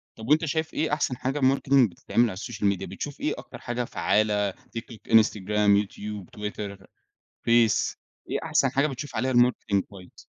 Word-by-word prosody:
طَب 110 - -9
وأنت 155 +2 +4
شايف 160 +1 -2
إيه 155 -1 0
أحسن 145 -4 0
حاجة 135 +3 -2
Marketing 135 -2 +4
بتتعمل 115 +6 +1
على 95 - -7
الSocial 115 +1 -6
Media؟ - - -7
بتشوف - - -6
إيه - - 0
أكتر - - -10
حاجة 120 0 -3
فعالة 105 -2 +1
TikTok، 115 +4 -10
Instagram، 105 -1 +3
YouTube، 105 0 -7
Twitter، 105 -1 -5 0.7
Face، 115 -2 +3 0.3
إيه - - 0
أحسن - - +2
حاجة 140 +2 +2
بتشوف 140 -1 -6
عليها 130 +4 0
Marketing 120 -5 +3
كويس؟ 95 -3 -14
115 Hz, 160 wpm, -26 LUFS, 105-130 Hz, 0.7 s, وأنت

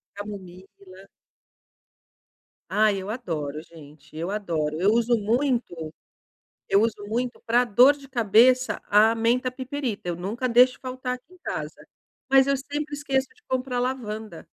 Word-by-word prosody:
Camomila. 190 -1 -11 1.6
Ai, 210 -1 +3
eu 195 - -6
adoro 155 - -4
gente, 155 -2 -16
eu 170 +4 -3
adoro, 165 -6 -2
eu 195 - +4
uso 235 +1 +2
muito. 225 - -1 0.8
Eu 200 - +4
uso 215 -2 -1
muito 240 +3 -3
para 240 +2 +3
dor 250 +5 +6
de 275 -2 -15
cabeça 240 -1 +3
a 215 +2 +5
menta 240 +3 +1
piperita, 255 -6 -4
eu 175 - -2
nunca 225 +8 -3
deixo 250 +2 +5
faltar 255 -1 -4
aqui 255 +8 -19
em 365 - -17
casa, - - -6 0.4
mas 270 -1 +6
eu 275 0 +1
sempre 290 +2 -5
esqueço 275 -2 -1
de 440 - -27
comprar 255 -1 -1
lavanda. 220 -7 -4
230 Hz, 140 wpm, -25 LUFS, 195-255 Hz, 1.6 s, dor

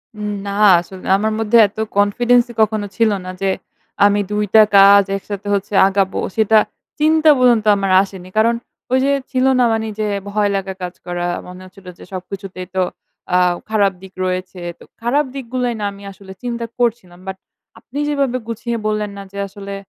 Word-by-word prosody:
উম 210 0 -4 0.2
না - - -3 0.3
আসলে 185 +2 -12
আমার 220 +2 -1
মধ্যে 225 +1 +3
এত 200 - -22 0.2
কনফিডেন্স 240 +4 +3
ই - - -12
কখনো 215 -1 +1
ছিল 225 -2 +3
না 185 - -5
যে 195 - +1 0.6
আমি 205 0 +3
দুইটা 210 +1 +4 0.2
কাজ 200 +1 +8
একসাথে 205 +1 -7
হচ্ছে 200 +1 -4
আগাবো। 195 -1 0 0.2
সেটা 220 0 +4 0.4
চিন্তা 315 +1 +4
পর্যন্ত 240 -4 +3
আমার 195 -1 -1
আসেনি। 190 -2 -10
কারণ 230 +2 +3 0.4
ওইযে 265 +2 +3 0.2
ছিল 255 0 +1
না - - +5
মানে 220 0 -1
যে 215 - 0 0.2
ভয় 205 0 +1
লাগা 195 0 -3
কাজ 180 0 -4
করা? 175 -1 -3 0.2
মনে 180 0 -10
হচ্ছিল 185 +1 -17
যে - - -11
সবকিছুতেই 185 0 -7
তো 185 - +2 0.5
আও 180 -1 +3
খারাপ 205 -3 +2
দিক 190 0 -13
রয়েছে। 185 0 -4 0.2
তো - - -14 0.2
খারাপ 275 +6 +1
দিকগুলাই 250 -2 -2
না - - -1
আমি 200 0 -13
আসলে 190 0 -13
চিন্তা 235 -1 -3
করছিলাম। 220 -7 -1
বাট 190 0 -5 0.4
আপনি 275 +4 -8
যেভাবে 275 -4 0
গুছিয়ে 230 +1 -3
বললেন 215 -1 -2
না 200 - -7
যে 200 - -6
আসলে 200 0 -9
205 Hz, 175 wpm, -18 LUFS, 190-235 Hz, 0.6 s, কাজ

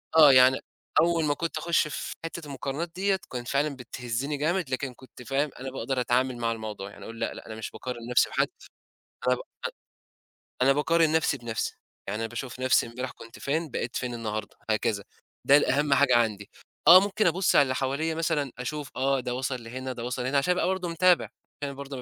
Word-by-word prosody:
آه، 155 -3 +9
يعني 130 +1 +7 0.4
أوّل 170 -1 +2
ما 145 - +2
كنت 165 +2 -3
أخش 170 0 +2
في 150 - -5
حتّة 165 -1 -6
المقارنات 140 +4 -4
ديّة، 195 +1 +1
كان 125 -1 -4
فعلًا 140 +3 0
بتهزني 125 +3 -4
جامد، 165 +1 0
لكن 130 0 -2
كنت 125 0 -14
فاهم، 140 +3 0
أنا 130 0 -5
باقدر 135 -1 -2
أتعامل 125 +1 +1
مع 115 -1 0
الموضوع. 110 -3 -5
يعني - - -13
أقول 115 0 -9
لأ، - - -1
لأ، - - -10
أنا 110 - -7
مش 110 - -6
باقارن 120 -2 -6
نفسي 125 - +4
بحد، - - +1 0.8
أنا 125 - +5
ب - - -9 1.2
أنا 135 +1 +6
باقارن 160 +2 +3
نفسي 160 -3 +2
بنفسي، 115 -2 -3 0.3
يعني 105 +3 -2
أنا 115 - -2
باشوف 125 +2 -6
نفسي 130 -2 +3
امبارح 125 +2 -5
كنت 115 0 -13
فين، 155 +3 -1
بقيت 120 0 -3
فين 125 -1 -2
النهارده، 110 -2 -4
هكذا، 110 -2 0 0.4
ده 140 - +8
الأهم 145 0 +3
حاجة 140 -3 +5
عندي. 105 -3 0 0.4
آه، 180 +2 +11
ممكن 205 +2 +1
أبُص 175 +2 +3
على 130 -2 +4
حواليّا 140 +5 -1
مثلًا، 155 -5 -1
أشوف 145 +3 -4
آه، 135 +1 +2
ده 125 0 -3
وصل 130 -1 -3
لهنا، 130 +3 -5
ده 120 -2 -6
وصل 125 0 -3
هنا، 140 +2 +2
عشان 160 +6 +2
أبقى 180 - +1
برضه 185 -1 -1
متابع، 175 +1 +4
عشان - - -13 0.3
أنا 140 - -3
برضه 140 0 -7
135 Hz, 200 wpm, -27 LUFS, 120-155 Hz, 1.2 s, آه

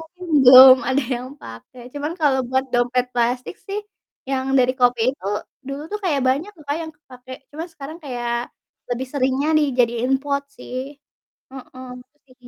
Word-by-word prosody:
mungkin 360 +3 -12 0.2
belum 255 +1 +10
ada 265 +1 +1
yang 250 +1 -7
pake. 115 - -12 0.2
Cuman 295 +3 -3
kalo 285 -3 +3
buat 260 +1 0
dompet 245 +1 +1
plastik 245 +1 -1
sih, 400 +1 -3 0.5
yang 265 -1 -1
dari 255 0 +3
kopi 245 -1 +3
itu, 270 - -18 0.4
dulu 275 +2 -5
tuh 420 - -2
kayak 290 -6 +1
banyak 290 +10 0
tuh 305 - -16
Kak, 290 - 0
yang 320 -1 -8
kepake. 255 -3 -14 0.2
Cuman 320 +3 -6
sekarang 310 +2 -9
kayak 240 -3 -4 0.6
lebih 255 +2 -2
seringnya 270 +2 0
dijadiin 250 -3 +1
pot 280 -1 -1
sih. 250 0 -9 0.8
Heeh, 255 -1 -11 0.3
terus 295 - -43
di 255 - -20
260 Hz, 165 wpm, -21 LUFS, 250-290 Hz, 0.8 s, belum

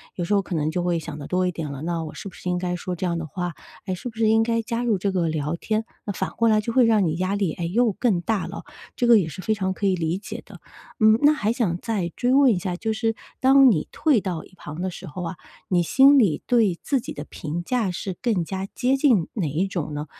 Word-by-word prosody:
有 175 - -3
时 170 - -1
候 200 - +4
可 190 -2 -5
能 155 0 0
就 175 - -1
会 175 -1 +1
想 160 -2 -6
得 145 - -7
多 185 0 +1
一 180 - 0
点 160 -4 -5
了， 140 -1 -7
那 165 0 -2
我 155 - -8
是 195 - -7
不 - - -20
是 - - -9
应 180 - 0
该 180 0 -2
说 180 +1 -4
这 180 - -3
样 170 -1 0
的 165 - -4
话？ 175 +2 -4 0.3
哎， 190 - -2
是 185 - -6
不 230 - -8
是 225 -1 +2
应 225 0 +4
该 230 0 0
加 230 +1 -3
入 225 -4 +2
这 195 +2 -1
个 180 -3 0
聊 155 0 -2
天？ 215 +4 -1 0.2
那 205 - -3
反 - - -2
过 230 - +1
来 215 -1 +4
就 230 - -3
会 250 +1 +5
让 220 -4 +3
你 160 -1 0
压 185 +2 0
力， 195 -5 0
哎， 170 - -4
又 225 +7 +2
更 205 -3 0
大 210 +1 -1
了 - - -7
哦。 - - -11 0.3
这 245 - 0
个 235 -2 +7
也 175 - -1
是 160 +4 -7
非 220 +2 +1
常 190 -3 -1
可 200 - -4
以 190 -1 +3
理 165 +1 -1
解 205 - -7
的。 - - -14 0.4
嗯， 215 +1 +6
那 295 +1 +6
还 220 -8 0
想 220 -8 0
再 205 -7 -2
追 245 +1 +1
问 275 -1 +6
一 205 - +1
下， 180 0 -3
就 220 +2 -1
是 225 0 0 0.3
当 270 0 +7
你 165 -10 +1
退 290 -9 +2
到 180 -4 -4
一 - - -21
旁 155 -1 -8
的 185 - -1
时 185 - -9
候 180 +2 -6
啊， 170 +1 -4 0.3
你 175 -2 +2
心 270 - +6
里 195 - +3
对 220 -8 +2
自 275 -3 0
己 - - -7
的 145 - -6
评 160 +3 -5
价 225 -1 0
是 185 +1 -5
更 210 -9 0
加 190 +2 -4
接 255 +2 +2
近 250 - +3
哪 190 -8 -1
一 165 +7 0
种 165 -6 -4
呢？ 150 +1 -4
190 Hz, 305 characters per minute, -24 LUFS, 170-225 Hz, 0.4 s, 个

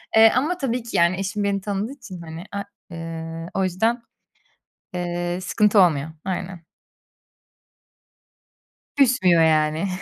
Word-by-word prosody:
Eee, 220 0 +8
ama 310 +8 +1
tabii 250 -6 -2
ki, 235 - -3
yani, 170 +2 +3
eşim 205 +2 -2
beni 200 -1 0
tanıdığı 205 +3 -3
için, 190 -11 -10
hani, 160 +1 -8
a 200 0 -3 0.3
eee, 165 0 -6
o 195 - 0
yüzden, 220 +7 0 0.9
eee, 175 0 -2
sıkıntı 210 +3 +3
olmuyor, 155 -5 +3 0.2
aynen. 185 -2 -4 2.3
Küsmüyor, 230 -11 +4
yani. 155 +3 +2
185 Hz, 120 wpm, -23 LUFS, 170-210 Hz, 2.3 s, Eee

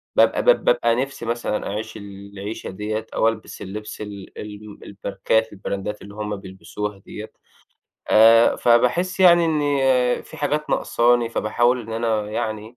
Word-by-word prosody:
باب - - +3
باب - - +4
بابقى 115 0 +3
نِفسي 130 -1 -3
مثلًا 115 -2 -2
أعيش 110 +2 -5
العيشة 100 +1 -8
ديّة 110 +3 -4
أو - - +3
ألبس 115 -1 -4
اللِّبس 105 +3 -7
ال 100 -2 -9
ال 105 0 -9 0.3
الماركات، 110 +2 0
البراندات 100 +1 -5
اللي 100 0 -11
هُم 105 -1 -4
بيلبِسوها 100 +1 -7
ديّة 105 +2 -10 0.8
آآ، 115 +1 +6
فباحس 150 +11 +2
يعني 175 -2 +7
إن 155 -2 +1 0.6
في - - -13
حاجات 150 +1 -2
ناقصاني 120 0 +2
فباحاول 120 +3 +1
إن 115 -1 -8
أنا 110 -2 -1
يعني 110 +2 -4
110 Hz, 140 wpm, -22 LUFS, 105-120 Hz, 0.8 s, يعني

